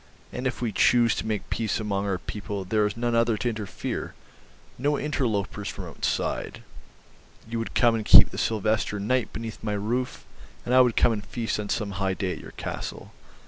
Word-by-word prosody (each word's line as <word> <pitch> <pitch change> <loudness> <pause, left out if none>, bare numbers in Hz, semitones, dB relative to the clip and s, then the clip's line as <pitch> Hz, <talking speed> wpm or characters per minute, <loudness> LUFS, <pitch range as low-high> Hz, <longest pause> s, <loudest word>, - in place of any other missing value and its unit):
And 125 +1 -2
if 125 - -3
we 115 - 0
choose 120 +2 +4
to - - -3
make 105 -2 -3
peace 115 -1 0
among 100 -2 -1
our 95 -2 0
people 100 +2 -5
there 105 +3 +2
is 105 - -6
none 120 0 0
other 115 -1 +3
to 120 - 0
interfere, 105 -4 -4 0.6
no 145 +3 +1
interlopers 105 -8 -1
from 95 - -6
outside... 80 - -2 0.8
You 115 0 -3
would 115 - -5
come 120 -1 +5
and 110 -1 -1
keep - - +9
the - - -5
Sylvester 110 -1 0
night 120 +4 0
beneath 110 0 -7
my 105 -1 -1
roof, 120 +5 -2 0.4
and 125 - -1
I 130 - +8
would 125 -3 +3
come - - +4
and 105 -2 -3
feast 115 -1 -3
on 105 -1 -4
some 105 -3 -1
high 95 -1 +1
day 95 -1 -2
at - - -5
your - - -11
castle - - -6
110 Hz, 195 wpm, -26 LUFS, 100-120 Hz, 0.8 s, keep